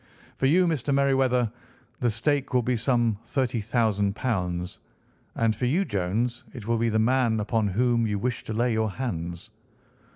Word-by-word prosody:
For 135 - +2
you, 180 +6 +4
Mr. 150 -5 -1
Merryweather, 135 -4 +2 0.5
the 120 - +2
stake 135 +4 0
will 125 - +3
be 125 +2 +1
some 120 -3 +1
£ - - -27
30,000; 115 -5 0 1.2
and 115 -1 +1
for 125 - -2
you, 175 +10 +2
Jones, 115 - -1
it 115 -5 -8
will 115 -1 +1
be 115 0 +2
the 110 - +1
man 115 0 +2
upon 110 0 0
whom 115 +3 +1
you 105 -1 -1
wish 120 +3 -2
to 110 - -4
lay 120 +2 +1
your 110 0 +1
hands." 85 -8 -5
120 Hz, 165 wpm, -26 LUFS, 110-130 Hz, 1.2 s, you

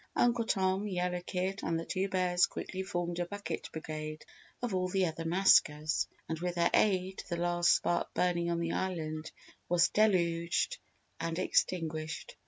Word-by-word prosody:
Uncle 240 -1 +3
Tom, 190 0 +1
Yellow 180 -2 -1
Kid 185 +2 -2
and 165 0 -1
the 165 - -5
Two 195 0 -1
Bears 180 -1 +3
quickly 190 - -5
formed 175 -2 -3
a 175 - 0
bucket 205 +2 -5
brigade 155 -1 -6 0.4
of 240 -5 -1
all 185 0 +1
the 190 0 +1
other 165 0 -4
maskers, 160 -3 +3 0.2
and 160 -1 -3
with 180 0 -2
their 170 0 +2
aid 190 -2 +2
the 170 - -1
last 175 0 +3
spark 175 - 0
burning 170 -1 +1
on 170 0 0
the 170 0 -1
island 160 -4 -3 0.4
was 175 0 +4
deluged 180 - +2 0.4
and 165 0 -2
extinguished. 165 - -1
175 Hz, 160 wpm, -32 LUFS, 165-190 Hz, 0.4 s, was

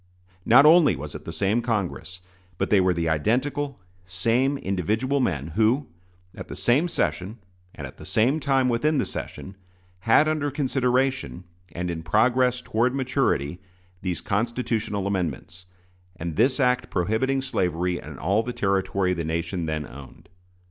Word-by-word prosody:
Not 130 +5 +7
only 160 -1 +6
was - - -7
it - - -9
the - - -5
same 100 +8 0
Congress, 100 -5 -3 0.4
but - - -2
they 100 -2 +5
were 90 0 +3
the 85 -1 -1
identical, 125 - 0 0.3
same 115 +10 +1
individual 110 - -1
men 80 - -1
who, 115 - +1 0.4
at - - -9
the - - -7
same 140 +8 +2
session, 90 - -2 0.4
and - - -7
at - - -11
the - - -11
same 125 +8 +2
time 135 -2 +2
within 145 +6 +1
the - - +1
session, 95 - -7 0.4
had 115 +10 +4
under 155 -2 0
consideration, 130 - 0 0.3
and 85 +2 -3
in 80 -1 -5
progress 125 +7 +2
toward 125 +4 0
maturity, 125 - 0 0.4
these 90 -2 -3
constitutional 110 -1 -1
amendments, 90 -1 -3 0.5
and 85 -2 -5
this 130 - +2
act 125 -2 +1
prohibiting 110 +9 0
slavery 90 -7 -1
in - - -10
all 95 +9 +1
the 120 +2 -5
territory 95 -2 0
the 85 -2 -3
nation 85 +2 -2
then 75 -1 -2
owned. 70 +3 -13
110 Hz, 150 wpm, -24 LUFS, 90-130 Hz, 0.5 s, Not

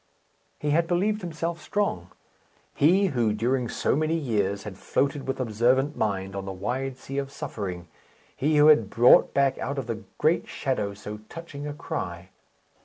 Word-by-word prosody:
He 150 - -1
had 165 +2 +2
believed 205 +5 +1
himself 170 0 -4
strong 155 - -1 0.6
he 185 +6 +4
who, 115 -4 +2
during 120 +3 0
so - - 0
many 155 +2 +1
years, 105 -9 -1
had 105 -3 -7
floated 140 0 -1
with 135 - -2
observant 130 +5 +2
mind 95 -2 -2
on 100 -1 -4
the 95 - -4
wide 125 +7 -3
sea 135 +1 -4
of 135 -1 -4
suffering; 90 -9 -5 0.5
he 150 +2 +1
who 150 - +7
had 115 -10 +5
brought 120 +3 +6
back 140 -1 +2
out 140 +2 -3
of 135 - -2
the 115 -2 -5
great 160 +3 +2
shadow 105 -7 -2
so 105 +1 -7
touching 150 -3 -7
a 145 - -4
cry. 90 - -5
130 Hz, 170 wpm, -26 LUFS, 105-150 Hz, 0.6 s, who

